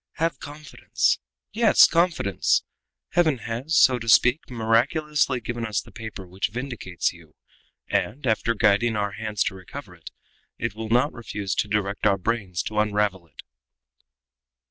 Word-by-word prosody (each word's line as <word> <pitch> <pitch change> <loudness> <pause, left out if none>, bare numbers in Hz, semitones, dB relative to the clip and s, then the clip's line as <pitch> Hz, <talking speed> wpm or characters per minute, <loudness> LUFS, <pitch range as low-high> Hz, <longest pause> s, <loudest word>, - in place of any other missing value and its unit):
Have 165 -4 -1
confidence 150 +1 -2 0.3
yes, 225 0 +6
confidence! 165 - +1 0.5
Heaven 160 -5 +2
has, 120 +7 -2
so 130 -2 +5
to 115 0 -5
speak, 125 +6 +5
miraculously 130 +4 +1
given 120 0 -5
us 110 -3 -1
the - - -11
paper 110 -4 -8
which 95 +2 -2
vindicates 115 -8 -3
you, 80 -2 -18 0.5
and, 135 +7 -2
after 115 0 +1
guiding 110 +2 +3
our 105 -1 -1
hands 105 -1 -2
to - - -2
recover 95 -1 -10
it, - - -12 0.5
it - - -3
will 110 +1 -6
not 125 +6 +2
refuse 105 -5 -4
to 105 - 0
direct 100 0 0
our 100 -2 +3
brains 95 -3 -2
to 105 -1 -2
unravel 105 -4 0
it." - - -14
110 Hz, 145 wpm, -24 LUFS, 100-130 Hz, 0.5 s, yes